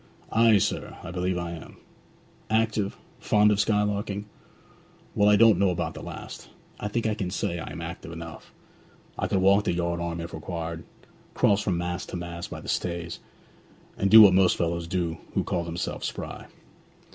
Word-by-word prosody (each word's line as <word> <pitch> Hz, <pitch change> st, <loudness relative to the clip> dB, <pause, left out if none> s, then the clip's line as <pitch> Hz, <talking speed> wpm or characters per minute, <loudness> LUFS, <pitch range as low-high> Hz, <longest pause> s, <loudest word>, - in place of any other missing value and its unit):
'Ay, 115 Hz, -1 st, +5 dB
sir; 95 Hz, -, -2 dB
I -, -, -6 dB
believe 90 Hz, 0 st, -1 dB
I 85 Hz, -1 st, -3 dB
am.' 85 Hz, -1 st, -10 dB, 0.7 s
'Active? 110 Hz, -2 st, 0 dB, 0.2 s
Fond 105 Hz, 0 st, +4 dB
of 105 Hz, -, +1 dB
skylarking?' 105 Hz, -1 st, 0 dB, 0.9 s
'Well, 105 Hz, 0 st, +4 dB
I 105 Hz, -, +6 dB
don't 110 Hz, +1 st, +6 dB
know 100 Hz, -1 st, +4 dB
about 90 Hz, -, -2 dB
the -, -, -9 dB
last. -, -, -9 dB, 0.3 s
I 105 Hz, -, -3 dB
think 115 Hz, +2 st, -2 dB
I 110 Hz, -, +2 dB
can 100 Hz, -4 st, -3 dB
say 85 Hz, -2 st, -2 dB
I -, -, -6 dB
am 85 Hz, -, -7 dB
active 85 Hz, +1 st, -7 dB
enough. 85 Hz, -1 st, -9 dB, 0.7 s
I -, -, 0 dB
could -, -, 0 dB
walk 100 Hz, +2 st, +4 dB
the -, -, +1 dB
yard 85 Hz, 0 st, -1 dB
arm, 85 Hz, -1 st, -3 dB
if 85 Hz, +1 st, -6 dB
required, 80 Hz, 0 st, -5 dB, 0.5 s
cross 100 Hz, 0 st, +3 dB
from 95 Hz, -5 st, 0 dB
mast 90 Hz, +1 st, -3 dB
to -, -, -4 dB
mast 85 Hz, 0 st, -6 dB
by -, -, -7 dB
the -, -, -11 dB
stays, 85 Hz, -1 st, -3 dB, 0.8 s
and 100 Hz, -, 0 dB
do 110 Hz, +2 st, +11 dB
what 100 Hz, -3 st, +7 dB
most 95 Hz, -1 st, +4 dB
fellows 85 Hz, 0 st, -1 dB
do 85 Hz, -2 st, -2 dB, 0.2 s
who -, -, +2 dB
call 85 Hz, -, -1 dB
themselves 85 Hz, +1 st, -4 dB
spry.' -, -, -7 dB
90 Hz, 180 wpm, -26 LUFS, 85-105 Hz, 0.9 s, do